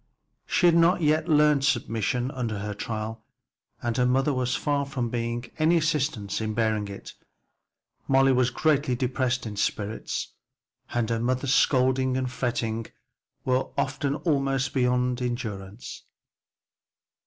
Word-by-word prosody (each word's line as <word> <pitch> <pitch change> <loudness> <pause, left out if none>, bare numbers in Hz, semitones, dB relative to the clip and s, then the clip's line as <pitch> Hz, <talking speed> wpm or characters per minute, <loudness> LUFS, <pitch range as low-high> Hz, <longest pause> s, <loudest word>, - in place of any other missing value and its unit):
She 180 - +2
had 170 - +6
not 170 +1 +4
yet 155 +2 +2
learned 150 -2 +4
submission 120 0 0
under 115 -5 -3
her 105 +1 -4
trial, 110 +1 -5 0.6
and 120 -1 -1
her 125 - +3
mother 135 +3 +2
was 130 0 0
far 145 -1 0
from 130 -4 -3
being 120 0 -3
an 155 +1 +4
assistance 145 - 0
in 110 -1 -2
bearing 110 -2 0
it. 100 0 -9 0.9
Molly 135 0 +4
was 125 -1 +3
greatly 145 -1 +1
depressed 125 0 -1
in 105 -2 -6
spirits, 105 +1 -2 0.6
and 120 -2 0
her 115 - 0
mother's 130 +3 0
scolding 130 -1 +3
and 130 -1 -2
fretting 115 -3 -2 0.6
were 130 0 +1
often 140 0 -1
almost 135 -4 0
beyond 125 -1 +1
endurance. 110 -4 -5
125 Hz, 130 wpm, -26 LUFS, 115-135 Hz, 0.9 s, had